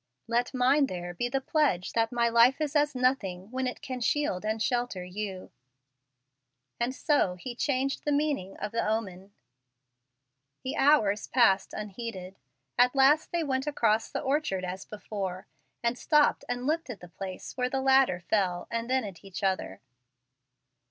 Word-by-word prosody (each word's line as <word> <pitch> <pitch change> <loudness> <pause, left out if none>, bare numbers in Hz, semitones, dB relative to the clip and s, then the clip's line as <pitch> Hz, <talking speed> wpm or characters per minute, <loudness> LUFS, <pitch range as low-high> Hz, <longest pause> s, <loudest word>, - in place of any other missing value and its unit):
Let 240 +1 0
mine 270 +3 +4
there 175 -3 -5
be 240 +8 -2
the 270 +2 0
pledge 280 - +1
that 225 -1 +1
my 235 -1 +2
life 235 +4 +5
is 305 -1 -2
as 295 -1 +2
nothing 220 -7 0
when 260 0 -1
it 250 - -6
can 255 -2 -5
shield 235 -7 0
and 215 +1 -1
shelter 240 -4 -1
you." 190 0 -6 1.3
And 240 +2 -1
so 275 - +1
he 240 +7 -7
changed 275 +1 -1
the 295 - 0
meaning 285 -10 -1
of 210 - -4
the 230 - 0
omen. 200 -3 -3 1.3
The 260 - -3
hours 220 -8 +3
passed 195 -7 +3
unheeded. 200 -3 -6 0.4
At 250 +2 +5
last 280 +4 +4
they 340 -1 0
went 265 -1 -1
across 225 -6 +1
the - - -3
orchard 265 -10 0
as 185 +2 -5
before, 195 -3 -5 0.4
and 235 +1 +1
stopped 300 -1 +3
and 245 0 -2
looked 320 +1 -1
at 230 - -6
the 180 - -11
place 185 +2 -7
where 250 -1 0
the 270 - -1
ladder 265 -9 +4
fell, 180 -2 0
and 230 +1 -2
then 260 -1 +2
at 195 -4 -8
each 195 0 -8
other. 185 - -1
235 Hz, 165 wpm, -28 LUFS, 195-265 Hz, 1.3 s, life